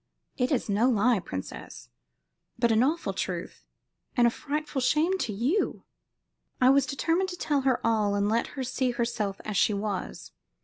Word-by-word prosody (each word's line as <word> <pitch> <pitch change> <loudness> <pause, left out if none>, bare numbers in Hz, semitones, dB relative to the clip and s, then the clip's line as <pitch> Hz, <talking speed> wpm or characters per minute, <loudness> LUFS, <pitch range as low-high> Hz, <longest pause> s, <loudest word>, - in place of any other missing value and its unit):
"It 250 +1 0
is 265 - 0
no 215 +5 +2
lie, 230 -1 +3
princess, 95 - -8 0.7
but 235 -1 +2
an 220 0 +4
awful 310 +7 0
truth, - - -5 0.5
and 240 - +5
a 235 - +4
frightful 295 +1 -3
shame 305 +8 +2
to 225 - -1
you." 250 - 0 0.8
I 255 +1 +6
was 275 0 +3
determined 330 +6 0
to 360 - -6
tell 290 -5 0
her 260 -2 +2
all 215 -3 +2
and 200 0 +1
let 230 +2 +1
her 265 - -1
see 255 0 -1
herself 235 -5 -2
as 215 -2 -2
she 210 - +3
was. 200 -2 -4
245 Hz, 170 wpm, -27 LUFS, 215-280 Hz, 0.8 s, I